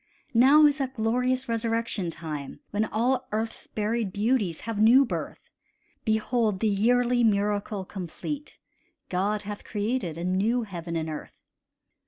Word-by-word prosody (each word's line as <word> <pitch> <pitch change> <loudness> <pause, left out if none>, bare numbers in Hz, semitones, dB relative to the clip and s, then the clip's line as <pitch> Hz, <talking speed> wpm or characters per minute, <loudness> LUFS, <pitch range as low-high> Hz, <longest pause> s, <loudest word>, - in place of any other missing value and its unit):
Now 275 +6 +7
is 295 0 +3
that 265 -1 -2
glorious 250 +3 0
resurrection 230 -4 -1
time 155 -4 -6
When 210 +1 +1
all 250 +4 0
earth's 220 +1 -3
buried 215 -1 -1
beauties 205 -4 0
have 225 -2 -4
new 250 +5 +7
birth: - - -6 0.5
Behold 220 -2 +1
the 220 - +1
yearly 240 +4 +3
miracle 205 -2 +1
complete, 210 - -6 0.5
God 200 +3 0
hath 205 0 -6
created 205 -5 -2
a 170 - -4
new 205 +7 +1
heaven 170 -5 -6
and 160 -1 -1
earth! 155 -1 -7
220 Hz, 135 wpm, -27 LUFS, 195-245 Hz, 0.5 s, Now